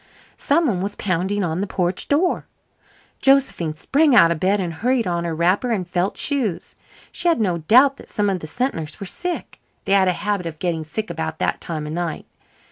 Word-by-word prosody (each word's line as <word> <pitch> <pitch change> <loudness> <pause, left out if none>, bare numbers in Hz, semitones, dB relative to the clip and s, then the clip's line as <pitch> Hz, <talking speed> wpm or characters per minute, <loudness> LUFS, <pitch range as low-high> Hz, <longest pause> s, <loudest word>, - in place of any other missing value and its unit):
Some 325 +4 +2
one 200 -10 0
was 200 +1 -3
pounding 190 +2 -1
on 170 +1 -1
the 205 - -2
porch 180 -1 -2
door. 330 +6 +1 0.7
Josephine 270 - +3
sprang 280 - +3
out 170 -7 +7
of 165 - -1
bed 195 +4 +2
and 175 -3 -2
hurried 235 +7 0
on 170 -1 -1
her 165 -1 -2
wrapper 180 +9 +1
and 195 -6 -1
felt 180 +2 -1
shoes. 250 - -2 0.4
She 350 - -1
had 335 -7 +3
no 180 -6 0
doubt 255 - +5
that - - -14
some 205 -1 0
of 190 -2 0
the 155 - -8
Sentners 165 - -3
were 200 - -5
sick. 350 - -5 0.2
They 195 - -2
had 195 -1 +5
a 180 - +3
habit 205 -1 -2
of 160 -2 -7
getting 165 -2 -2
sick 175 +5 -5
about 160 -1 -4
that - - -1
time 155 -3 -4
of 150 - -5
night. 170 -1 -3
190 Hz, 210 wpm, -21 LUFS, 170-240 Hz, 0.7 s, out